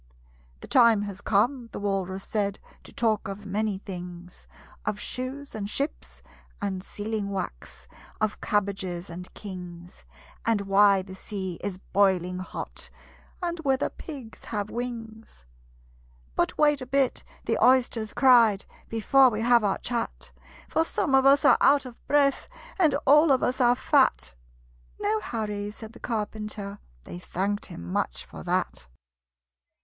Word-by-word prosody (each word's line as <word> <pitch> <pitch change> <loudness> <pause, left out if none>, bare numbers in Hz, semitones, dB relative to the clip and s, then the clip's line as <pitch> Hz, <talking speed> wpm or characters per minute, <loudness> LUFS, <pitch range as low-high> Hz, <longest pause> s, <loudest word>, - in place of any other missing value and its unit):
"The - - -9
time 230 -5 +5
has 200 -1 -6
come," 230 +5 +1
the - - -5
Walrus 195 -1 -2
said, 200 -2 -1 0.3
"To - - -11
talk 220 -4 0
of 195 +1 -7
many 205 0 -1
things: 180 -2 -9 0.4
Of 210 -1 -2
shoes 265 +5 -5
and 205 -2 -4
ships 280 +7 -4 0.4
and 190 -3 -3
sealing 210 0 -4
wax 190 - -6 0.3
Of 215 -1 -1
cabbages 195 -4 -1
and 180 +2 -8
kings 180 -3 -9 0.4
And 225 -3 +2
why 195 0 +4
the 190 0 -10
sea 190 -2 -5
is 195 -2 -3
boiling 185 -2 +1
hot 185 - -7 0.5
And 345 -1 -2
whether 270 -4 +1
pigs 270 -8 -10
have 210 -2 -3
wings." 225 - -7 0.9
"But - - 0
wait 295 -2 +4
a 255 - -6
bit," 270 0 +1 0.2
the - - +1
Oysters 245 -4 +3
cried, 235 -6 +5 0.2
"Before 260 +4 +5
we 215 -2 -3
have 235 -1 +5
our 200 -2 +1
chat; 235 -1 -4 0.4
For 320 - +2
some 325 -2 -1
of 270 0 +6
us 275 +1 +5
are - - +6
out 280 -1 +5
of 245 -2 -11
breath, 285 -1 +3 0.3
And 325 -5 +4
all 295 +3 +6
of 260 - +3
us 255 +1 0
are 245 0 +5
fat!" - - +2 0.7
"No 215 +1 +1
hurry," 210 -2 -3
said 220 +1 -10
the - - -13
Carpenter: 210 -2 -4 0.2
They 175 - -8
thanked 200 +3 -2
him 85 - -9
much - - -2
for - - -10
that. - - -2
215 Hz, 145 wpm, -27 LUFS, 195-250 Hz, 0.9 s, of